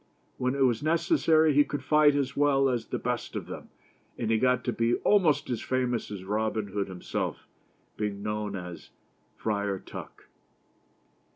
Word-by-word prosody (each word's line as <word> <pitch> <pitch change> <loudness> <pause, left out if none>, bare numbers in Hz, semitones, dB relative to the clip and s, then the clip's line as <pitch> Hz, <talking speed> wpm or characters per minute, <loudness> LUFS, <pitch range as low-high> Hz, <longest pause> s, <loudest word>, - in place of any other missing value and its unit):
When 125 +1 0
it 140 - -2
was 120 -3 +1
necessary, 160 - +3
he 145 +1 +6
could 145 0 -5
fight 150 -1 +5
as 140 -1 -1
well 140 -1 +3
as 120 -3 -2
the - - -2
best - - -3
of - - -3
them, - - -8 0.5
and 115 -2 -1
he 110 - +3
got 125 0 +2
to - - -1
be 115 +1 +2
almost 180 -9 +3
as 120 - -2
famous 125 -2 -1
as 100 -3 -6
Robin 105 +1 -1
Hood 100 0 -2
him 95 -2 -9
self, - - -3 0.5
being 100 -1 -3
known 105 -1 -2
as 90 -3 -8 0.5
Friar 100 -2 -1
Tuck. - - -10
120 Hz, 170 wpm, -28 LUFS, 105-145 Hz, 0.5 s, he